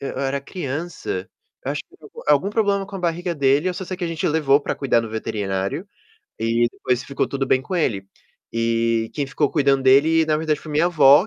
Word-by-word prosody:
eu 135 -1 -5
era 140 0 -1
criança, 145 - -5 0.4
eu - - -1
acho - - -3
que - - -55
teve - - -37
algum - - -11
algum 150 +7 +4
problema 200 -2 +1
com 195 - -7
a - - -5
barriga 175 0 -1
dele. 140 +3 +2
Eu 180 - -2
só 190 +1 -5
sei 185 +1 -5
que 180 - -3
a - - 0
gente 165 -1 -2
levou 150 -3 +3
para - - -2
cuidar 130 -4 +2
no 115 - -5
veterinário 105 - -3 0.5
e 115 +1 +2
depois 125 0 -1
ficou 140 - -1
tudo 135 -1 -2
bem 130 - +3
com 185 - -5
ele. 105 - 0 0.5
E 115 0 +1
quem 145 -2 -1
ficou 145 +1 0
cuidando 140 -2 +2
dele, 150 +5 +5
na 155 - +2
verdade, 155 -1 -1
foi 155 - -9
minha 155 +3 +3
avó 150 +1 +6
140 Hz, 225 wpm, -22 LUFS, 125-165 Hz, 0.5 s, avó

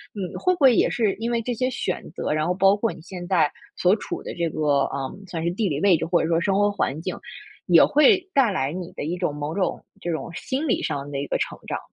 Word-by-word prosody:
嗯， 190 -3 -5
会 365 - +2
不 345 - -7
会 265 -3 +7
也 - - +3
是 215 -5 0
因 230 +3 -3
为 235 - +1
这 245 +2 -2
些 255 +2 0
选 - - -3
择， - - -3
然 155 +1 0
后 180 - +1
包 195 +2 +4
括 225 +2 -1
你 - - -13
现 175 +1 -8
在 165 -6 +3 0.2
所 180 +2 +3
处 - - -6
的 - - -6
这 170 -1 -1
个， 145 -3 +1
嗯， 140 +9 -5
算 165 -2 -4
是 170 - 0
地 200 +4 -1
理 145 -4 -2
位 190 -4 +5
置， - - -3
或 170 0 +2
者 - - -1
说 165 -1 +3
生 190 +3 +1
活 205 +1 +3
环 155 -6 -2
境， 180 +2 -4 0.5
也 170 -3 +7
会 370 +6 +4
带 265 -6 +4
来 140 -7 -1
你 180 0 -6
的 - - -5
一 170 +4 -2
种， 175 -5 -1
某 150 +2 -4
种 195 -2 -1 0.2
这 175 - -2
种 165 +1 -4
心 270 - -3
理 245 - +1
上 145 -2 -3
的 140 - -3
一 140 - -3
个 - - 0
成 - - -3
长。 - - -2
180 Hz, 290 characters per minute, -24 LUFS, 160-215 Hz, 0.5 s, 会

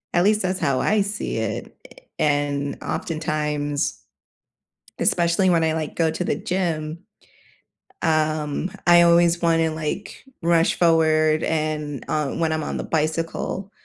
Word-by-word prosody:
At 175 - +3
least 210 +2 +3
that's 185 -1 -1
how 135 -2 +1
I 215 0 +2
see 205 +2 -3
it, - - -4
a - - -17 0.2
and 145 -1 0
oftentimes 150 - -2 1.0
especially 175 +2 +2
when 170 -2 +3
I 160 0 +1
like 155 -1 -4
go 165 -1 +1
to 160 +3 -3
the - - 0
gym, 165 -4 -2 1.0
um, 155 +1 0 0.2
I 175 0 +8
always 170 0 +4
want 165 -1 +3
to 160 -1 +1
like, 155 +6 -5 0.2
rush 170 0 +3
forward, 155 -2 +3
and, 155 -3 -2
uh, 150 -2 -1
when 165 -1 0
I'm 155 0 -2
on - - -3
the - - -3
bicycle, 165 +5 -2
160 Hz, 145 wpm, -23 LUFS, 155-170 Hz, 1.0 s, I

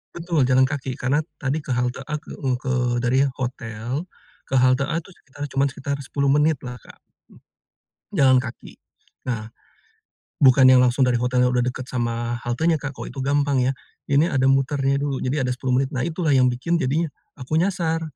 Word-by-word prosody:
Betul, 165 -6 0
jalan 130 0 +4
kaki. 135 -3 -4
Karena 135 +4 0 0.2
tadi 140 +3 -1
ke 140 - -6
halte 125 +2 -1
A, 150 - -2
ke 150 - -9
u 130 -3 0
ke 130 0 -3 0.3
dari 130 +3 +3
hotel 120 +3 -4 0.4
ke 135 - -2
halte 130 +2 +3
A 155 - -2
tuh 195 - -16
sekitar 145 -4 -11
cuma 135 +1 +2
sekitar 140 +1 -4
10 140 0 -1
menit 150 +2 +3
lah, 125 -1 -7
Kak. - - -17 1.1
Jalan 130 -2 +5
kaki. 120 -2 -9 0.5
Nah, 110 -2 -3 0.9
bukan 130 -1 +6
yang 130 -1 +7
langsung 125 +1 +3
dari 120 -2 +1
hotelnya 125 0 +2
udah 125 - +2
dekat 125 +1 -3
sama 120 -1 -2
haltenya, 150 +7 0
Kak, 135 -1 -6
kalau - - -6
itu 135 - -7
gampang 140 0 +1
ya. 130 +2 +2 0.4
Ini 145 +5 +3
ada 130 -1 +2
muternya 135 0 +2
dulu. 140 -1 -2
Jadi 130 +3 -1
ada 125 - -1
10 130 0 -1
menit. 135 - -3
Nah, 125 - -1
itulah 160 -2 0
yang 130 -2 +5
bikin 165 +8 -1
jadinya 150 +4 0 0.2
aku 145 +4 -1
nyasar. 170 -3 0
135 Hz, 185 wpm, -23 LUFS, 125-145 Hz, 1.1 s, yang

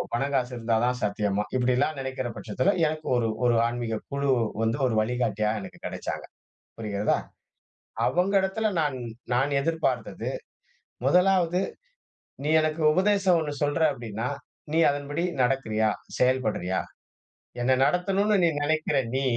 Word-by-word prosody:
பண 120 - -1
காசு 125 -1 0
இருந்தா 115 -1 0
தான் 125 0 0
சாத்தியமா? 105 0 0
இப்டிலாம் 130 +4 +1
நெனைக்குற 130 -2 -3
பட்சத்துல 145 - 0
எனக்கு 155 0 -4
ஒரு 115 -2 +1 0.2
ஒரு 120 -1 +4
ஆன்மீகக் 120 -2 -4
குழு 140 0 0 0.3
வந்து 115 +4 0
ஒரு 115 - -1
வழிகாட்டியா 110 -2 0
எனக்கு - - -10
கெடச்சாங்க. - - -4 0.5
புரிகிறதா? 105 -2 0 0.9
அவங்க 185 +3 +1
இடத்துல 195 +3 -1
நான் 145 -4 0 0.4
நான் 135 +4 +2
எதிர்பார்த்தது 165 +2 -1 0.8
1வது 180 -1 +3 0.8
நீ 145 - -2
எனக்கு 155 +1 -1
உபதேசம் 190 +1 +3
ஒண்ணு 150 -2 -3
சொல்ற 145 +3 +1
அப்டின்னா, 115 -2 -4 0.4
நீ 160 - +2
அதன்படி 145 +2 -3 0.2
நடக்குறீயா? 110 -4 +1 0.3
செயல்படுறியா? 110 -8 +1 0.8
என்ன 130 +2 +3
நடத்தணும்னு 195 +6 +2
நீ 170 - +5
நெனைக்குறா 155 -1 +1
நீ, 135 - +1
130 Hz, 125 wpm, -26 LUFS, 115-160 Hz, 0.9 s, நீ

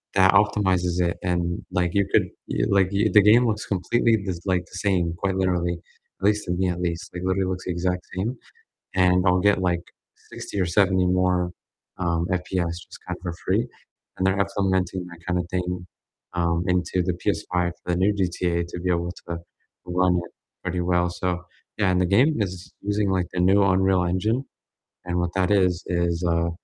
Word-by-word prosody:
that 95 0 +6
optimizes 95 -4 +2
it, 85 -1 +1
and, 85 -1 -1
like, 90 -1 +1
you 100 -1 +3
could, - - +4 0.2
y - - -2
like, 95 -2 +3
y 100 +2 +1
the 105 - +8
game 115 +4 +6
looks 110 -1 -1
completely 110 +4 +2
just 90 -2 -4
like, 90 -2 +1
the 90 +2 -9
same, 90 -4 +2
quite 95 -1 +1
literally, 90 -2 0 0.4
at - - -1
least 105 0 +2
to 90 - -3
me 90 +1 0
at 90 0 -3
least, 85 +2 -3
like 90 0 -5
literally 95 0 +1
looks 90 0 -5
the 90 - -2
exact 90 +1 -1
same, 110 +8 -2 0.6
and 90 0 +4
I'll 90 0 +4
get, 100 - +2
like, 90 -2 0 0.5
60 100 - -5
or 90 - +2
70 95 +1 +3
more, 90 -1 +1 0.5
um, 85 -2 0
FPS 90 -1 -1
just - - -12
kind 90 0 -3
of - - -25
for 85 - -3
free, 110 +6 +1 0.5
and 95 - 0
they're 95 +1 +1
implementing 95 -2 -1
that 85 -1 -12
kind 90 -1 +1
of 90 - -2
thing, 90 0 -3 0.5
um, 85 0 +1
into 90 0 +1
the 90 0 0
PS5 90 -1 0
for 90 - -3
the - - +1
new 100 +3 +3
GTA 90 -2 0
to 90 - -6
be 90 0 0
able 85 0 -1 0.2
to 85 - -2 0.5
run 90 0 +2
it - - -15 0.3
pretty 90 0 -2
well, 90 0 +2
so 90 0 -2 0.3
yeah, 100 -3 +2
and 90 0 +2
the - - +3
game 125 - +3
is 95 -2 -4
using 105 0 0
like 90 -2 0
the 90 - -2
new 95 +3 +5
Unreal 95 -1 +3
Engine, 110 +9 0 0.6
and 90 0 -2
what 85 0 0
that 95 0 +1
is 90 -3 +2
is, 85 -1 0
uh, 85 0 +1
90 Hz, 200 wpm, -24 LUFS, 90-95 Hz, 0.6 s, the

